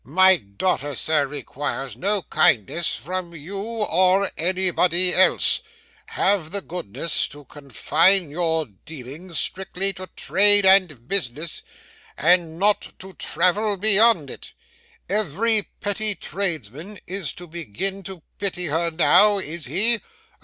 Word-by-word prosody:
'My 185 Hz, +8 st, +4 dB
daughter, 145 Hz, -, -3 dB
sir, 150 Hz, +1 st, +1 dB
requires 135 Hz, -2 st, -5 dB
no 200 Hz, -, -1 dB
kindness 130 Hz, -, +1 dB
from 175 Hz, +6 st, -6 dB
you 175 Hz, +6 st, -7 dB
or 200 Hz, -3 st, +1 dB
anybody 180 Hz, 0 st, +2 dB
else. 185 Hz, -, +3 dB, 0.5 s
Have 190 Hz, -5 st, 0 dB
the 200 Hz, +3 st, -4 dB
goodness 165 Hz, -, -2 dB
to 145 Hz, 0 st, -14 dB
confine 155 Hz, -, +1 dB
your 160 Hz, -1 st, -1 dB
dealings 145 Hz, -, -9 dB
strictly 190 Hz, +1 st, -1 dB
to 185 Hz, +1 st, -9 dB
trade 205 Hz, 0 st, +4 dB
and 180 Hz, -11 st, +3 dB
business, 160 Hz, -4 st, 0 dB, 0.6 s
and 165 Hz, +1 st, +2 dB
not 205 Hz, +3 st, 0 dB
to 190 Hz, 0 st, -11 dB
travel 205 Hz, +4 st, 0 dB
beyond 210 Hz, -, +4 dB
it. -, -, -11 dB, 0.5 s
Every 210 Hz, +2 st, 0 dB
petty 210 Hz, 0 st, -2 dB
tradesman 170 Hz, -, -5 dB
is 190 Hz, -4 st, -4 dB
to 175 Hz, -, -11 dB
begin 175 Hz, -, -4 dB
to 185 Hz, -3 st, -10 dB, 0.2 s
pity 190 Hz, -3 st, -2 dB
her 165 Hz, +2 st, -1 dB
now, 185 Hz, +5 st, +4 dB
is 170 Hz, -4 st, -4 dB
he? 210 Hz, -, +2 dB
180 Hz, 120 wpm, -22 LUFS, 155-195 Hz, 0.6 s, My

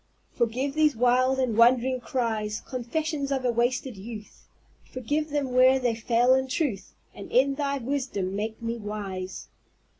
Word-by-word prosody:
"Forgive 250 Hz, +4 st, -1 dB
these 305 Hz, -2 st, +3 dB
wild 250 Hz, +3 st, +3 dB
and 255 Hz, -4 st, 0 dB
wandering 250 Hz, +2 st, +4 dB
cries, 225 Hz, -4 st, -2 dB
Confessions 280 Hz, +3 st, -3 dB
of 265 Hz, -2 st, -1 dB
a 245 Hz, -, +3 dB
wasted 240 Hz, 0 st, -1 dB
youth; 210 Hz, +1 st, -10 dB, 0.4 s
Forgive 290 Hz, +5 st, -2 dB
them 285 Hz, -3 st, -2 dB
where 255 Hz, +1 st, +5 dB
they 245 Hz, -2 st, +1 dB
fail 235 Hz, +2 st, +3 dB
in 265 Hz, 0 st, +1 dB
truth, 250 Hz, -, -2 dB, 0.2 s
And 200 Hz, -, -10 dB
in 270 Hz, +3 st, +4 dB
Thy 280 Hz, 0 st, -1 dB
wisdom 250 Hz, -8 st, -3 dB
make 220 Hz, +2 st, -3 dB
me 230 Hz, +1 st, -2 dB
wise." 200 Hz, -4 st, -6 dB
250 Hz, 150 wpm, -26 LUFS, 225-265 Hz, 0.4 s, where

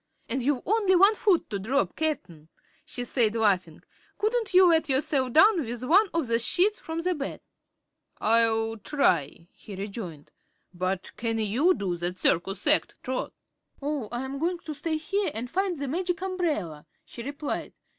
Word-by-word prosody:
"And 255 Hz, +3 st, -1 dB
you've 265 Hz, 0 st, 0 dB
only 405 Hz, -2 st, +3 dB
one 395 Hz, +4 st, +6 dB
foot 400 Hz, -5 st, +2 dB
to 200 Hz, -, -2 dB
drop, 260 Hz, +8 st, 0 dB
Cap'n," 180 Hz, -, -3 dB, 0.3 s
she 245 Hz, -, -4 dB
said, 235 Hz, -3 st, +1 dB
laughing. 185 Hz, -7 st, 0 dB, 0.3 s
"Couldn't 445 Hz, +1 st, 0 dB
you 370 Hz, 0 st, +7 dB
let 325 Hz, -3 st, +3 dB
yourself 265 Hz, -1 st, +1 dB
down 360 Hz, -, +5 dB
with 240 Hz, 0 st, -5 dB
one 385 Hz, +11 st, +4 dB
of 330 Hz, -3 st, 0 dB
the 230 Hz, -1 st, +1 dB
sheets 365 Hz, -, +2 dB
from 325 Hz, +1 st, -4 dB
the 365 Hz, +2 st, 0 dB
bed?" 280 Hz, -4 st, -5 dB, 0.8 s
"I'll 225 Hz, 0 st, +2 dB
try," 175 Hz, -, 0 dB
he 205 Hz, -, -11 dB
rejoined. 195 Hz, -6 st, -7 dB, 0.4 s
"But, 185 Hz, +1 st, -3 dB
can 230 Hz, -1 st, -1 dB
you 240 Hz, -, +2 dB
do 180 Hz, -3 st, -2 dB
that 175 Hz, +2 st, -2 dB
circus 190 Hz, +3 st, 0 dB
act, 300 Hz, +1 st, +4 dB
Trot?" 260 Hz, 0 st, -3 dB, 0.5 s
"Oh, 280 Hz, -6 st, -3 dB
I'm 265 Hz, +3 st, -4 dB
goin' 345 Hz, +3 st, 0 dB
to 310 Hz, -, -4 dB
stay 315 Hz, +2 st, -2 dB
here 380 Hz, +5 st, -1 dB
an' 225 Hz, +2 st, -3 dB
find 375 Hz, +1 st, -1 dB
the 280 Hz, 0 st, -4 dB
Magic 350 Hz, +4 st, -2 dB
Umbrella," 305 Hz, -, -2 dB, 0.2 s
she 235 Hz, -, -9 dB
replied. 285 Hz, +4 st, -5 dB
265 Hz, 165 wpm, -27 LUFS, 215-335 Hz, 0.8 s, you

